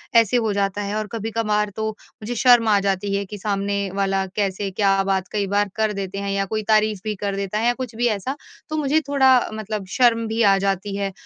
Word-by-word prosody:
ऐसे 230 +1 +5
हो 220 -3 0
जाता 200 0 -1
है 205 +1 -3
और 215 0 -2
कभी-कभार 215 -2 -1
तो 220 0 -2
मुझे 215 +2 -9
शर्म 240 -1 +5
आ 205 -2 +4
जाती 195 0 -1
है 200 0 -1
कि 205 +2 -8
सामने 200 -1 -2
वाला 195 -1 0
कैसे 200 -1 -1
क्या 195 0 +2
बात 190 -1 -1
कई 205 -2 -1
बार 205 +1 +1
कर 220 -1 0
देते 195 -1 -5
हैं 200 0 -3
या 195 0 0
कोई 215 +2 -3
तारीफ़ 215 -2 +3
भी 215 -1 -2
कर 200 -1 -1
देता 200 +1 -3
है 230 - 0
या 245 - +3
कुछ 245 -3 -6
भी 240 +1 +1
ऐसा 225 +6 -2 0.3
तो 310 - -2
मुझे 300 +1 +2
थोड़ा 265 -3 +4
मतलब 215 -2 -4
शर्म 230 -2 +3
भी 225 +1 -1
आ 195 -2 +5
जाती 195 +1 -1
है 195 -1 -2
210 Hz, 230 wpm, -22 LUFS, 195-225 Hz, 0.3 s, ऐसे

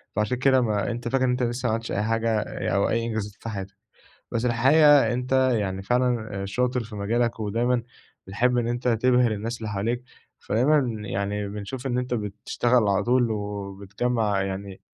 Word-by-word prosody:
فعشان 105 +4 0
كده 130 0 +4
ما 105 -3 0
أنت 120 0 -5
فاكر 130 +2 +1
إن - - +1
أنت 125 0 0
لسه 120 +1 -1
ما 110 - +1
عملتش 115 +1 -3
أي 105 - 0
حاجة، 115 0 +1 0.3
أو 100 - +2
أي 115 0 0
إنجازات 110 -3 -3
في 115 - -6
حياتك. 95 -2 -6 0.6
بس 115 +1 -1
الحقيقة 135 +1 +5
أنت 125 +1 -4 0.2
يعني 95 -3 -1
فعلًا 115 -3 0
شاطر 125 +4 0
في 110 -1 -10
مجالك، 115 +3 0
ودايمًا 115 +3 0 0.4
بتحب 125 +5 +1
إن 120 -1 +1
أنت 120 +1 -2
تبهر 125 0 +3
الناس 115 +3 -3
اللي 110 -2 -5
حواليك، 115 +5 -2 0.4
فدايمًا 120 -2 +1
يعني 100 +1 -2
بنشوف 105 +6 -6
إن 125 - -1
أنت 125 0 -2
بتشتغل 110 +2 0
على 100 - +2
طول، 120 -1 +2
وبتجمّع 100 +1 -2
يعني 95 0 -5
115 Hz, 175 wpm, -25 LUFS, 105-125 Hz, 0.6 s, الحقيقة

